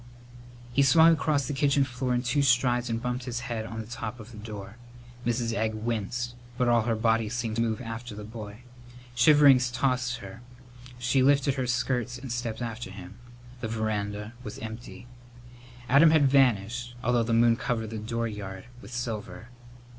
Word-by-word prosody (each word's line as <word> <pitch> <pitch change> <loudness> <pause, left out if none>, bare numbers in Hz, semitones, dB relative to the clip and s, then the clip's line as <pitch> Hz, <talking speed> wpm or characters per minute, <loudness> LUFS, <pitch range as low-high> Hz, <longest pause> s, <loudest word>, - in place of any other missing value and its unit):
He 140 - +4
swung 160 +4 +7
across 145 -2 +1
the - - -2
kitchen 140 0 +3
floor 125 -1 -2
in 120 - 0
two 130 +4 +1
strides 125 -2 +2
and 115 0 -1
bumped 125 +1 -3
his 125 -1 -3
head 115 -2 -4
on 110 0 -6
the 110 - -5
top 115 0 -6
of 110 +2 -11
the 110 - -10
door. 105 -1 -8 0.5
Mrs. 120 -1 0
Egg 110 -1 -1
winced, 120 +2 -3 0.2
but 125 - +1
all 120 -1 +4
her 115 - +2
body 110 0 +1
seemed 115 -2 -3
to - - +2
move 115 -1 0
after 115 -1 -6
the 105 - -7
boy. 110 +1 -9 0.5
Shiverings 130 0 +6
tossed 125 0 0
her. 100 +4 -10 0.6
She 125 +2 +1
lifted 140 0 +4
her 130 -2 -2
skirts 125 0 -1
and 125 -1 -7
stepped 120 -1 -3
after 115 -3 -5
him. 95 +2 -11 0.4
The 115 - -3
veranda 105 -1 -3
was 105 - -7
empty. 110 +2 -8 0.8
Adam 140 +6 +7
had 155 -3 +5
vanished, 120 -2 +2
although 120 -1 +2
the 115 0 0
moon 115 0 +5
covered 115 -3 -2
the 110 - -4
dooryard 105 -4 -4 0.2
with 100 - -12
silver. 115 -4 -5
120 Hz, 175 wpm, -27 LUFS, 110-125 Hz, 0.8 s, swung